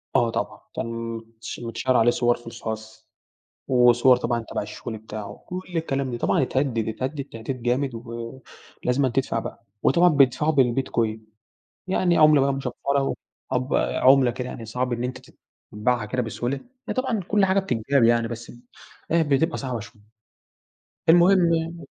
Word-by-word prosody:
آه، 120 - +4
طبعا - - -3 0.2
كان 115 0 -4
متش 115 0 -9
متشيَّر 120 +2 0
عليه 120 +1 +5
صوَر 120 0 +2
في 120 - -16
الخاص 110 -1 -7 0.6
وصوَر 125 0 +5
طبعًا 120 -1 -2
تبع - - -2
الشغل 115 -2 -7
بتاعه، 105 -1 -8
كل 180 +1 -4 0.2
الكلام 135 -5 -1
ده، 120 - -3
طبعًا - - +1
اتهدد، 130 -4 0
اتهدد 135 +5 -3
تهديد 125 0 -6
جامد 125 +1 0
و 115 +2 -7 0.4
ولازمًا 130 +2 +2
تدفع 130 -2 0
بقى، 115 - -8 0.2
وطبعًا 175 +1 +5
بيدفعوا 145 +1 +3
بالBitcoin 120 -4 +1 0.7
يعني 180 -2 +2
عملة 155 -2 +6
بقى 140 0 +2
مشفرة 135 -2 -4 0.8
وعب 130 0 -1
عملة 130 -1 +4
كده 125 +1 -5
يعني 115 - -7
صعب 125 +2 -2
إن 120 0 -3
أنت 125 0 -3
ت - - -35 0.4
تتبِعها 110 +2 0
كده 125 +4 -1
بسهولة، 120 +3 -3
يعني 250 - -9
طبعًا 255 -4 0
كل 205 0 +3
حاجة 190 +1 +3
بتتجاب 135 - +1
يعني، 115 0 +4
بس 115 0 -7 0.6
إيه، 170 - +4
بتبقى 150 +3 +1
صعبة 130 -3 -3
شوية. 105 0 -12 1.1
المهم 175 0 +6
يعني 165 +1 -3
125 Hz, 155 wpm, -24 LUFS, 115-140 Hz, 1.1 s, عملة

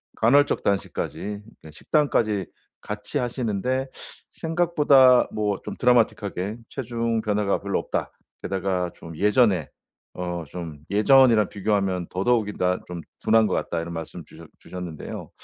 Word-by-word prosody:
간헐적 140 +6 +3
단식까지 100 +1 -2 0.2
예. 80 - -10
식단까지 110 - 0 0.3
같이 105 +7 -5
하시는데 125 +1 -1 0.4
"생각보다 150 -7 +4
뭐 105 -2 -1
좀 - - -6
드라마틱하게 110 -4 +1
체중 115 -3 -2
변화가 105 -2 0
별로 100 0 -1
없다. - - -3 0.3
게다가 95 -2 -1
좀 80 -1 -10
예전에. 105 - +2 0.5
어 85 -2 -3
좀 80 -2 -7
예전이랑 115 0 +5
비교하면 95 -4 -1
더더욱이나 100 -3 0
좀 90 -1 -6 0.2
둔한 110 0 +4
것 100 - -1
같다." 85 - -1
이런 85 +1 -6
말씀 80 -1 -7
주셨 - - -14
주셨는데요. 90 -4 -8
105 Hz, 305 characters per minute, -24 LUFS, 90-120 Hz, 0.5 s, 예전이랑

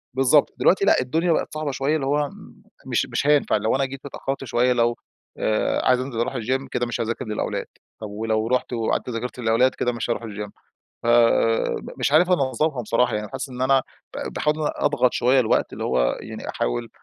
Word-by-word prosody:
بالضبط. 135 +2 +4
دلوقتي 195 +2 +3
لأ، - - +5
الدنيا 165 +7 0
بقت 155 - 0
صعبة 155 -2 -2
شوية 135 +3 0
اللي 140 -4 -1
هو 145 +1 +1
م - - -15 0.3
مش - - 0
مش 145 - -1
هينفع 145 -6 +3
لو 110 +3 0
أنا 135 +1 +1
جيت 135 +1 -9
اتأخرت 135 0 -4
شوية 125 0 +2
لو 120 -1 +1 0.4
آآ 110 0 0
عايز 125 -1 +4
أنزل 130 -3 -4
أروح 120 - -1
الgym 130 +3 -1
كده 120 - 0
مش 120 0 -3
هاذاكر 115 +2 -3
للأولاد، 110 -1 -3 0.4
طب 110 - -5
ولو 110 +1 -1
رُحت 125 +1 0
وقعدت 115 +1 -1
ذاكرت 125 +2 -5
للأولاد 120 +2 +2
كده 125 - 0
مش 120 0 -4
هاروح 120 - -1
الgym 105 -2 -6 0.5
فم 115 -1 +3 0.2
مش - - 0
عارف 175 +5 +4
أنظمها 140 -3 +1
بصراحة 120 +1 +1
يعني 105 0 -3
حاسس 135 0 -5
إن 125 0 -7
أنا 135 0 +4 0.3
ب - - -5
باحاول 150 0 +1
إن 155 - -5
أنا 150 - -1
أضغط 135 -4 +2
شوية 130 +2 +3
الوقت 120 - +1
اللي - - -5
هو 60 -1 +1
يعني - - -8
أحاول - - -2
125 Hz, 205 wpm, -23 LUFS, 115-135 Hz, 0.5 s, لأ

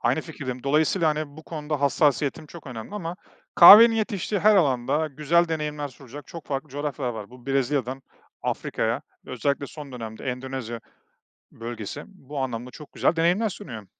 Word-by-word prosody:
Aynı 125 +6 +1
fikirdeyim, 130 -6 -7
dolayısıyla, 155 +4 +2
hani, 150 -1 -3
bu 160 - -10
konuda 150 -2 -4
hassasiyetim 145 +2 +1
çok 165 -1 -12
önemli 120 - -8
ama 175 -3 -5 0.4
kahvenin 225 +6 +10
yetiştiği 210 -2 -1
her 215 -1 +6
alanda 140 -1 +2
güzel 155 +4 +1
deneyimler 150 -2 -3
sunacak 135 +1 -12
çok 165 -2 -10
farklı 140 +1 -3
coğrafyalar 145 -2 -3
var. 110 0 -8
Bu, 125 0 -15
Brezilya'dan 135 -1 -1 0.4
Afrika'ya, - - -2 0.2
özellikle 140 +3 -1
son 145 -3 -10
dönemde 115 -1 -7
Endonezya 125 -2 -4 0.7
bölgesi, 115 -3 -6
bu 150 -7 -10
anlamda 125 -2 -3
çok 150 +3 -13
güzel 165 - +1
deneyimler 180 +7 +2
sunuyor. 110 - -8
145 Hz, 150 wpm, -25 LUFS, 125-160 Hz, 0.7 s, kahvenin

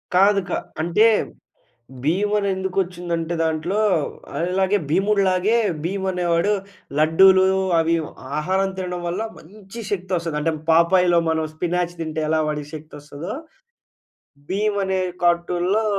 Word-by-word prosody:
కాదు 200 +2 +5
క - - -5 0.3
అంటే 175 +7 +3 1.0
భీమ్ 190 +8 +1
అని 200 - 0
ఎందుకు 190 0 -4
వచ్చిందంటే 175 -2 -4
దాంట్లో 160 +4 -1 0.6
అల్లాగే 190 +4 +1
భీముడులాగే 195 +3 +2 0.3
భీమ్ 190 +3 -2
అనేవాడు 175 +2 +1 0.5
లడ్డూలు 185 +4 +6 0.4
అవి 165 +1 +2
ఇ - - -1 0.4
ఆహారం 190 +5 0
తినడం 180 -1 -4
వల్ల 175 +5 -2 0.2
మంచి 200 +5 -11
శక్తి 185 -2 -3
వస్తది. 165 -3 -3
అంటే 165 +2 0 0.2
పాపాయ్‌లో 170 +1 +4
మనం 160 -1 0
స్పినాచ్ 175 +1 -1
తింటే 160 -1 -3
ఎలా 160 0 +2
వాడికి 150 -1 -4
శక్తి 155 +1 -11
వస్తాదో, 145 +6 -7 1.2
భీమ్ 205 +2 0
అనే 190 0 0 0.2
కార్టూన్‌లో 175 +4 +1
180 Hz, 125 wpm, -22 LUFS, 165-190 Hz, 1.2 s, లడ్డూలు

